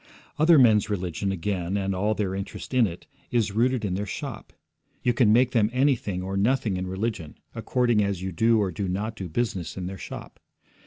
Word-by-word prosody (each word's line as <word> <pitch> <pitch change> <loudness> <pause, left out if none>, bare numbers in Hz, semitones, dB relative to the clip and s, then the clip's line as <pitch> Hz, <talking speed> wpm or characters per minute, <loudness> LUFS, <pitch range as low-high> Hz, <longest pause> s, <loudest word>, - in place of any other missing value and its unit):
Other 160 +1 +6
men's 110 -6 +5
religion, 95 -1 -2
again, 95 0 -2
and 95 -1 -1
all 105 +3 0
their 100 -3 -1
interest 100 +6 -6
in 125 -3 +4
it, 85 -1 -9 0.2
is 115 -4 +1
rooted 120 +2 +1
in 95 - -1
their 100 +2 -2
shop; - - -6 0.5
you 120 - +3
can 115 -3 +4
make 125 +3 +4
them 110 -4 +3
anything 125 -8 +1
or 95 +1 -4
nothing 110 0 +1
in 90 0 -3
religion, 95 -5 -4 0.2
according 120 -4 +1
as 100 -2 -1
you 95 +1 -4
do 115 +6 +3
or 100 -3 0
do 95 +4 -3
not 105 +5 -2
do 95 -4 -6
business 95 -2 -2
in 90 - -4
their 95 +1 -6
shop. - - -9
105 Hz, 200 wpm, -26 LUFS, 95-115 Hz, 0.5 s, Other